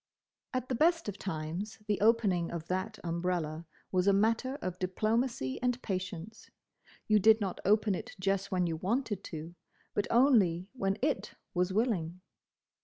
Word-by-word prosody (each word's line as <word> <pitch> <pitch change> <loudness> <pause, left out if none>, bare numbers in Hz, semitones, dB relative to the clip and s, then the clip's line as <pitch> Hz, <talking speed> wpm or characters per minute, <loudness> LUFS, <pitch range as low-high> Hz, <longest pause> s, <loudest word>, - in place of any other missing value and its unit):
At 255 -1 -2
the 255 - -2
best 330 +4 +3
of 205 -1 -5
times 170 +3 -4
the 210 -2 0
opening 205 -6 +3
of 170 -2 -5
that 185 +4 -2
umbrella 170 -2 -2 0.2
was 185 0 +2
a 200 - +6
matter 230 +6 +2
of 185 -10 -5
diplomacy 215 - 0
and 250 0 +1
patience. 185 0 -5 0.6
You 215 -1 +5
did 220 +2 +6
not 195 -4 -3
open 210 +1 +4
it 225 +6 -6
just 195 +1 0
when 180 -1 +2
you 165 -2 -1
wanted 205 +2 -1
to, 160 +1 -7 0.4
but 205 - 0
only 215 -9 +4
when 195 -5 -1
it 295 +1 -1 0.2
was 180 +1 +1
willing. 185 -6 0
195 Hz, 155 wpm, -31 LUFS, 180-225 Hz, 0.6 s, a